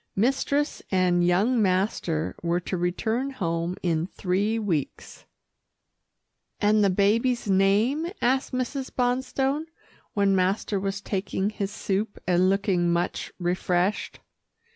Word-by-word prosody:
Mistress 270 Hz, +6 st, 0 dB
and 180 Hz, -2 st, +2 dB
young 205 Hz, +8 st, +3 dB
master 185 Hz, -5 st, 0 dB
were 170 Hz, +1 st, 0 dB
to 185 Hz, -, -3 dB
return 220 Hz, +9 st, -1 dB
home 170 Hz, -7 st, -2 dB
in 165 Hz, -1 st, 0 dB
three 195 Hz, +4 st, -1 dB
weeks. 180 Hz, -10 st, -3 dB, 1.3 s
"And 210 Hz, 0 st, +3 dB
the 200 Hz, -, +4 dB
baby's 220 Hz, +6 st, +2 dB
name?" 205 Hz, -, +2 dB
asked 260 Hz, +2 st, +1 dB
Mrs. 255 Hz, +1 st, -3 dB
Bonstone, 260 Hz, +4 st, 0 dB, 0.5 s
when 200 Hz, -1 st, +3 dB
master 190 Hz, +2 st, 0 dB
was 195 Hz, 0 st, -3 dB
taking 195 Hz, 0 st, -2 dB
his 200 Hz, -2 st, -3 dB
soup 205 Hz, +1 st, -2 dB
and 180 Hz, +1 st, +3 dB
looking 190 Hz, -3 st, +1 dB
much 170 Hz, +1 st, -1 dB
refreshed. 180 Hz, +2 st, -1 dB
195 Hz, 115 wpm, -26 LUFS, 180-230 Hz, 1.3 s, the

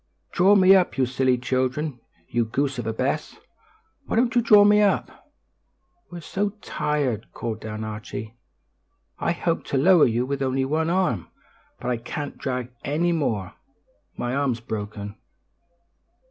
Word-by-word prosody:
"Draw 195 Hz, +3 st, +5 dB
me 190 Hz, -1 st, +7 dB
up! 185 Hz, -6 st, +2 dB
You 130 Hz, -, +3 dB
silly 130 Hz, 0 st, +1 dB
children! 130 Hz, +2 st, -1 dB, 0.3 s
You 120 Hz, -1 st, 0 dB
goose 135 Hz, +3 st, -1 dB
of 115 Hz, -, -4 dB
a -, -, 0 dB
Bess! 135 Hz, +6 st, -2 dB, 0.7 s
Why -, -, -2 dB
don't 235 Hz, +1 st, +2 dB
you 240 Hz, -, +4 dB
draw 210 Hz, -3 st, +7 dB
me 210 Hz, 0 st, +5 dB
up?" 205 Hz, -2 st, -1 dB, 0.8 s
"We're 175 Hz, -1 st, -8 dB
so 200 Hz, +5 st, -2 dB
tired?" 135 Hz, -7 st, -2 dB
called 110 Hz, -2 st, -4 dB
down 110 Hz, 0 st, -5 dB
Archie. 110 Hz, 0 st, -6 dB, 0.9 s
"I -, -, 0 dB
helped 170 Hz, -1 st, -2 dB
to 140 Hz, -, 0 dB
lower 175 Hz, +4 st, +6 dB
you 120 Hz, +1 st, 0 dB
with 140 Hz, +1 st, -3 dB
only 130 Hz, 0 st, 0 dB
one 160 Hz, +4 st, 0 dB
arm, 175 Hz, -, 0 dB, 0.5 s
but 125 Hz, -, -2 dB
I 120 Hz, -, 0 dB
can't 140 Hz, +5 st, -6 dB
drag 125 Hz, -2 st, -4 dB
any 160 Hz, +5 st, +1 dB
more. 115 Hz, -, -1 dB, 0.6 s
My 120 Hz, -, -2 dB
arm's 135 Hz, -4 st, 0 dB
broken." 105 Hz, -2 st, -6 dB
135 Hz, 150 wpm, -24 LUFS, 115-170 Hz, 0.9 s, me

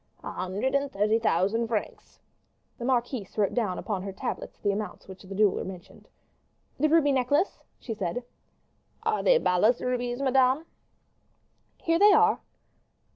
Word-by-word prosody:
"A -, -, -5 dB
hundred 195 Hz, +8 st, -2 dB
and 280 Hz, 0 st, 0 dB
thirty 210 Hz, +3 st, +2 dB
thousand 220 Hz, +3 st, +1 dB
francs." 220 Hz, -2 st, -4 dB, 0.6 s
The 240 Hz, -, -4 dB
marquise 245 Hz, -5 st, -1 dB
wrote 205 Hz, -2 st, +1 dB
down 210 Hz, -7 st, -1 dB
upon 205 Hz, -4 st, -3 dB
her 195 Hz, +1 st, -5 dB
tablets 190 Hz, -, -5 dB
the 205 Hz, -, 0 dB
amount 210 Hz, +1 st, -5 dB
which 190 Hz, -1 st, -11 dB
the 195 Hz, 0 st, -9 dB
jeweler 205 Hz, -1 st, +2 dB
mentioned. 185 Hz, -2 st, -10 dB, 0.7 s
"The 305 Hz, +2 st, +3 dB
ruby 305 Hz, -2 st, +4 dB
necklace?" 275 Hz, +7 st, +1 dB, 0.2 s
she 230 Hz, -, -5 dB
said. 210 Hz, +3 st, -3 dB, 0.8 s
"Are 445 Hz, -1 st, 0 dB
they -, -, +5 dB
balas 215 Hz, -, +3 dB
rubies, 245 Hz, 0 st, -2 dB
madame?" 265 Hz, +2 st, +3 dB, 1.1 s
"Here 330 Hz, 0 st, +1 dB
they 410 Hz, +1 st, +7 dB
are." 435 Hz, +1 st, +4 dB
235 Hz, 145 wpm, -27 LUFS, 200-275 Hz, 1.1 s, they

